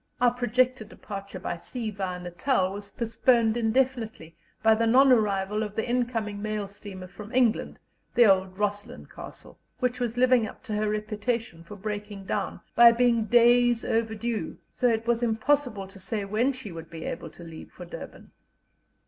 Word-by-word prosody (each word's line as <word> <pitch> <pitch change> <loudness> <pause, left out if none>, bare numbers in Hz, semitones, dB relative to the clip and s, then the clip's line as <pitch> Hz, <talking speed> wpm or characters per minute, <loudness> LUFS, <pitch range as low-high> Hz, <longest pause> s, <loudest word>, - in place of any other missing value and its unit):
Our 245 -1 +4
projected 250 -1 +1
departure 200 -3 -8
by 175 -1 -4
sea 225 +5 -4
via 190 -3 -4
Natal 185 +3 0
was 200 0 -7
postponed 230 +1 +2
indefinitely, 225 -7 -1 0.3
by 220 0 +6
the 230 +1 +1
non 265 +4 +6
arrival 210 -3 +2
of 210 -1 -4
the 220 - -1
incoming 235 -4 -1
mail 215 -1 -2
steamer 200 -2 -9
from 210 +4 -11
England, 245 -4 +2 0.4
the 240 -1 +7
old 190 -2 +3
Roslin 205 +3 -3
Castle, - - -11 0.2
which 250 -1 -1
was 240 -1 -2
living 250 -3 +4
up - - -12
to 230 -5 -5
her 210 0 0
reputation 215 -3 -3
of 205 -2 -10
breaking 205 -2 -5
down, - - -3
by 235 0 +9
being 235 -1 +2
days 240 0 +4
overdue, 225 0 -2 0.2
so 250 - +1
that 225 -2 +2
it 230 - -20
was 235 0 +2
impossible 235 -2 +1
to 195 - -13
say 205 +1 -3
when 220 +7 +1
she 255 -7 -8
would 165 -1 -9
be 165 -1 -8
able 165 - -5
to 170 - -13
leave 165 -1 -10
for 180 - -10
Durban. 170 - -10
220 Hz, 175 wpm, -27 LUFS, 200-240 Hz, 0.4 s, by